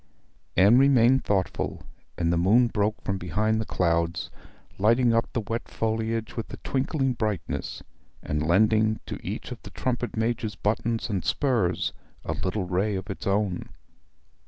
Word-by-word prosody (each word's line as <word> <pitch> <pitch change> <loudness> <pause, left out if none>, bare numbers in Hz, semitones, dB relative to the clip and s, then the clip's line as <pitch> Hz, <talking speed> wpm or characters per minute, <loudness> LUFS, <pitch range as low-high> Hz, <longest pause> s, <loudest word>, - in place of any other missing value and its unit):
Anne 100 +7 +7
remained 130 -1 +5
thoughtful; 95 -3 -1 0.3
and 85 0 +1
the - - +3
moon 105 +9 +5
broke 105 -1 0
from 95 -1 -2
behind 110 +6 0
the 110 - -5
clouds, 85 -1 0 0.5
lighting 115 +3 +4
up 115 +1 +1
the 120 - -1
wet 115 +2 -4
foliage 110 0 -2
with 115 - -5
a - - -6
twinkling 135 0 0
brightness, 105 -8 -3 0.4
and 75 0 -1
lending 110 +6 +3
to - - -7
each - - -5
of - - -7
the - - -10
trumpet 125 -2 -3
major's 110 -1 -1
buttons 115 +2 -1
and 100 -5 -2
spurs 115 - +1 0.3
a - - -1
little 95 +1 -2
ray 95 +4 0
of 95 +1 -4
its 95 - -6
own. 100 -2 0
110 Hz, 155 wpm, -26 LUFS, 95-115 Hz, 0.5 s, Anne